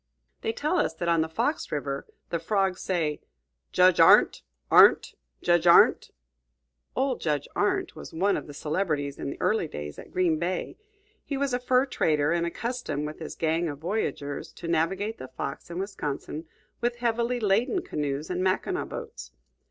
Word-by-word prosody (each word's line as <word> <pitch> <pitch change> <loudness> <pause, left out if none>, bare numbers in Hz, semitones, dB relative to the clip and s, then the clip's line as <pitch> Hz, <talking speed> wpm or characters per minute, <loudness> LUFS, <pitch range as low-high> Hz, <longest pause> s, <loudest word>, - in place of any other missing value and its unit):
They 445 - -1
tell 355 -2 0
us 160 - 0
that 170 +1 -4
on 170 -1 +3
the 160 - -1
Fox 290 - -1
River 140 -2 -3 0.2
the 170 - 0
frogs 190 +1 0
say, 160 -5 -1 0.5
"Judge 185 -1 +5
Arndt! - - +6 0.3
Arndt! - - +7 0.3
Judge 175 0 +3
Arndt!" 170 - +6 0.9
Old 260 -1 0
Judge 150 -3 -1
Arndt - - 0
was - - -9
one 195 +5 +1
of - - -5
the 145 - -9
celebrities 150 -3 -2
in - - -3
the - - -7
early 215 -6 +1
day 75 - -6
at - - -11
Green 175 -4 +1
Bay; 175 +2 -2 0.5
he 280 - -3
was 275 -2 -1
a 245 - +1
fur 255 +1 +3
trader, 150 - +1
and 170 0 +1
accustomed, 230 - -3
with 150 +1 -7
his 160 - -7
gang 165 +1 0
of 145 - -6
voyageurs, 150 -4 -3
to 170 - -8
navigate 190 +7 0
the 130 - -7
Fox 130 +5 -6
and 170 +1 -5
Wisconsin 160 -5 -4 0.3
with 240 0 0
heavily 240 +1 0
laden 235 - +1
canoes 145 +2 -3
and 180 0 -1
Mackinaw 190 - 0
boats. 465 -2 -8
175 Hz, 170 wpm, -27 LUFS, 155-225 Hz, 0.9 s, Arndt